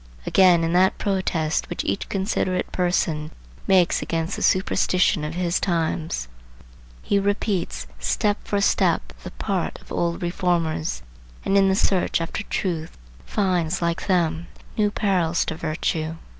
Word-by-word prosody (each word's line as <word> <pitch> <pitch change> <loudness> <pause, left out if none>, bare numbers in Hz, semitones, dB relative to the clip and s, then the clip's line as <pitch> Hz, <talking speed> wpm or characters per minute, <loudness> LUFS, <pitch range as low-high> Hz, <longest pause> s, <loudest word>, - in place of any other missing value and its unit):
Again, 180 -3 +5
in 165 +1 0
that 185 +1 +4
protest 185 -5 -1
which - - -3
each - - -2
considerate 190 -2 -1
person 165 -4 0 0.4
makes 185 -3 +4
against 165 +3 -2
the - - -6
superstition 185 -2 +2
of 150 +2 -4
his 175 -1 0
times, 165 - -1 0.8
he 200 - +2
repeats 195 - -1
step 205 - 0
for 205 - -1
step 60 - +2
the - - -7
part - - -2
of - - -19
old 170 0 -1
reformers, 175 -3 -1 0.4
and 195 - +1
in 195 -1 +5
the 190 - +3
search 190 -3 +1
after 165 +5 -3
truth 165 -4 -3 0.3
finds, 180 -4 0
like 170 -1 -1
them, 170 -3 +1 0.3
new 210 -1 +2
perils 180 -5 +1
to 160 - -3
virtue. 160 0 -2
175 Hz, 140 wpm, -23 LUFS, 160-190 Hz, 0.8 s, Again